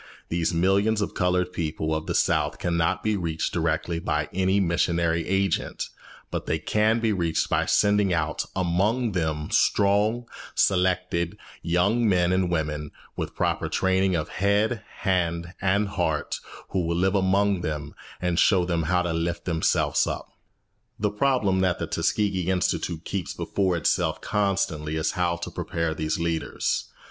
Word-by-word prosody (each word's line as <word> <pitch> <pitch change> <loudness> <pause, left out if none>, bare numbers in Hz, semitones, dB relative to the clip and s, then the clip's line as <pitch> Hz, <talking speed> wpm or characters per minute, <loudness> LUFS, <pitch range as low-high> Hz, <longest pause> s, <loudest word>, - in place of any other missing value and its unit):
These 85 -1 0
millions 100 +6 +2
of 105 - -2
coloured 90 0 +1
people 80 -1 -2
of 80 0 -3
the - - -1
South 75 -1 +1
cannot 85 -2 0
be 110 -1 +1
reached 85 -4 -2
directly 85 0 0
by - - -1
any 95 +1 +2
missionary 85 -2 +1
agent; 95 -1 0 0.4
but - - -4
they 80 - +1
can 110 +8 +2
be 115 -2 +1
reached 85 -4 0
by - - +2
sending 105 -2 +3
out 80 -2 0
among 100 +7 +1
them 80 -4 -2
strong, 105 +4 +2 0.3
selected 90 -1 +1 0.2
young 100 +7 +2
men 90 -2 +3
and 95 -1 +1
women, 75 -3 -2 0.3
with - - -3
the - - -32
proper - - 0
training 95 0 +2
of 80 0 -2
head, 105 +4 +1 0.2
hand, 85 -3 0
and 100 +2 +2
heart, - - -1 0.3
who 95 -2 0
will 85 0 0
live 95 +2 +2
among 100 0 +2
them 75 -2 -4 0.3
and 90 -1 0
show 95 -4 +4
them 85 -2 0
how 90 -1 +3
to 85 -2 -1
lift 85 +1 -2
themselves 85 -3 +1
up. - - -5 0.7
The 105 -1 0
problem 105 -4 +2
that 95 -1 +2
the - - -2
Tuskegee 95 -4 0
Institute 85 -2 -1
keeps 95 -3 -3
before 95 -3 0
itself - - +1
constantly 95 -7 -1
is 80 0 0
how 85 -1 0
to 85 - -6
prepare 85 -1 -2
these 80 0 -2
leaders. 85 -1 -1
90 Hz, 155 wpm, -25 LUFS, 85-100 Hz, 0.7 s, show